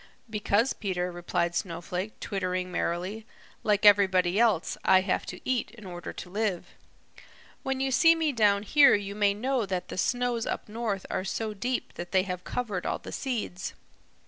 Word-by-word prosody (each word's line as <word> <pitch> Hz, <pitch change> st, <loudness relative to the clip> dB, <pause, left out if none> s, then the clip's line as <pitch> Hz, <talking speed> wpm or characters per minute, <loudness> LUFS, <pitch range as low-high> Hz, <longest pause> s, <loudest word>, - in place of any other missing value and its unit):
"Because, 215 Hz, +2 st, +1 dB
Peter," 180 Hz, -3 st, -2 dB
replied 175 Hz, 0 st, -1 dB
Snowflake, 180 Hz, +3 st, -4 dB
twittering 185 Hz, -2 st, -2 dB
merrily, 180 Hz, +5 st, -2 dB, 0.4 s
"like 210 Hz, -1 st, +2 dB
everybody 190 Hz, -2 st, +5 dB
else, 220 Hz, -8 st, +2 dB
I 190 Hz, 0 st, +6 dB
have 185 Hz, -1 st, -1 dB
to 180 Hz, -, -6 dB
eat 255 Hz, -2 st, 0 dB
in 215 Hz, -3 st, -14 dB
order 175 Hz, -2 st, -6 dB
to 180 Hz, -, -9 dB
live. 205 Hz, -3 st, -1 dB, 0.9 s
When 270 Hz, 0 st, -2 dB
you 270 Hz, 0 st, 0 dB
see 330 Hz, +5 st, +6 dB
me 320 Hz, -2 st, +1 dB
down 205 Hz, -5 st, +3 dB
here 280 Hz, +6 st, +6 dB
you 200 Hz, -1 st, -3 dB
may 205 Hz, -1 st, +2 dB
know 250 Hz, 0 st, 0 dB
that 185 Hz, -1 st, -3 dB
the -, -, -4 dB
snows 245 Hz, +1 st, 0 dB
up -, -, -3 dB
north 215 Hz, -3 st, -3 dB
are -, -, -1 dB
so 215 Hz, +3 st, -3 dB
deep 245 Hz, +5 st, -3 dB
that 175 Hz, +2 st, -7 dB
they 190 Hz, -1 st, +4 dB
have 180 Hz, -1 st, -5 dB
covered 210 Hz, -7 st, -3 dB
all -, -, 0 dB
the -, -, -10 dB
seeds. 220 Hz, -8 st, -3 dB
200 Hz, 170 wpm, -28 LUFS, 185-230 Hz, 0.9 s, I